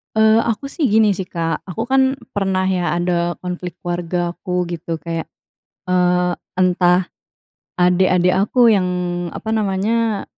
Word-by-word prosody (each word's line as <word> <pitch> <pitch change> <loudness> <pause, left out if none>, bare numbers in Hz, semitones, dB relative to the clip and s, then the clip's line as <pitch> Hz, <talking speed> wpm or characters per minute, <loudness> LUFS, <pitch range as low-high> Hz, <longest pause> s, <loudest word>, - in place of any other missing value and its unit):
Eee, 220 0 +5
aku 235 +5 -2
sih, 305 -1 -1
gini 220 -1 +4
sih, 190 - -3
Kak. 165 -2 -3
Aku 225 +6 -5
kan 265 0 +3 0.2
pernah 190 -2 0
ya, 180 -2 0
ada 175 0 0
konflik 180 -1 -5
keluargaku 175 +1 -2
gitu, 165 -1 -5
kayak, 165 +1 -4 0.6
eee, 180 -1 +2 0.2
entah 180 0 +3 0.7
adik-adik 180 0 +3
aku 230 +4 +4
yang, 190 -3 +2 0.5
apa 220 - -4
namanya, 215 +1 0
180 Hz, 125 wpm, -19 LUFS, 175-215 Hz, 0.7 s, Eee